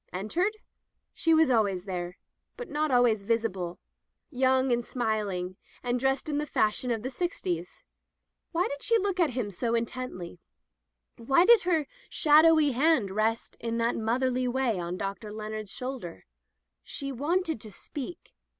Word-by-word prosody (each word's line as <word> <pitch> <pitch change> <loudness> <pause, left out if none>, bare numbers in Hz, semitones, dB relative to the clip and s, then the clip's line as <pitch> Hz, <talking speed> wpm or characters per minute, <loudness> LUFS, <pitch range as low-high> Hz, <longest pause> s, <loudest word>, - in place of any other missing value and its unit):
Entered? 345 - -1 0.6
She 330 - +1
was 320 -4 +5
always 200 -6 +1
there, 180 -2 -4 0.4
but 485 - -7
not 305 +1 0
always 245 -5 +4
visible, 195 -5 -1 0.5
young 260 -1 +2
and 240 0 +2
smiling, 205 -7 -2 0.3
and 245 0 0
dressed 270 +2 0
in 295 -1 0
the 300 - -2
fash 215 -4 +1
ion 250 - -2
of 225 -2 -1
the 260 - -3
sixties. 180 - -3 0.7
Why 350 +1 +1
did 285 0 -6
she 460 - +3
look 390 -3 -1
at 335 -4 +4
him 210 -5 -1
so 230 +5 -1
intently 230 -6 -4 0.4
— - - -53
^why 270 +9 +4
did 470 0 +7
her 320 -4 +2 0.2
shadowy 310 -1 +5
hand 260 -6 +2
rest 220 +3 -1
in 230 0 -2
that 230 0 +1
motherly 250 +3 0
way 245 -5 0
on 175 +1 -3
Dr. 200 +2 -5
Leonard's 215 -1 -5
shoul 260 +1 -4
der? 170 - -9 0.6
She 275 -1 -4
wanted 315 - -1
to 215 - -8
speak. 285 - -8
245 Hz, 160 wpm, -28 LUFS, 210-290 Hz, 0.7 s, did